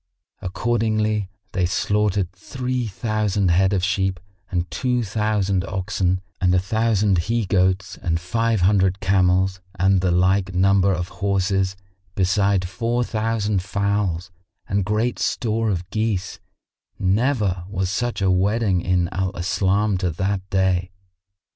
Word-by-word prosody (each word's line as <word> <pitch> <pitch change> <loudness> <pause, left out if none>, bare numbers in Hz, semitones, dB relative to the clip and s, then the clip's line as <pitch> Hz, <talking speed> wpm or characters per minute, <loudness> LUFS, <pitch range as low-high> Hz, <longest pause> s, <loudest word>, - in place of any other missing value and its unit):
Accordingly 110 0 0 0.2
they 90 -1 +1
slaughtered 105 -2 0
three 125 +5 -3
thousand 105 -2 0
head 95 +3 +3
of 95 -3 0
sheep 95 -1 0 0.3
and 90 -1 -1
two 125 +7 0
thousand 100 -3 0
oxen 95 -1 -1 0.2
and 90 -1 +3
a - - +4
thousand 105 -1 +1
he 115 -2 +1
goats 95 0 +1
and 85 -1 0
five 115 +3 0
hundred 95 0 +3
camels 95 0 +2
and 95 0 +3
the 90 - +1
like 95 +2 +2
number 95 +1 +4
of 90 -1 -2
horses, 95 -1 +1 0.4
beside 95 0 +2
four 120 +5 -1
thousand 110 -3 -1
fowls 100 -3 -1 0.4
and 100 -1 0
great 110 +4 0
store 115 -1 0
of 90 -3 -2
geese; 110 -4 -2 0.6
never 100 -2 +1
was 95 -2 -2
such 120 0 -2
wedding 95 +1 +2
in 90 -1 +1
Al 95 0 -2
Islam 95 +3 +1
to 90 -1 0
that 95 +4 -1
day. 95 -2 +1
95 Hz, 130 wpm, -22 LUFS, 90-105 Hz, 0.6 s, a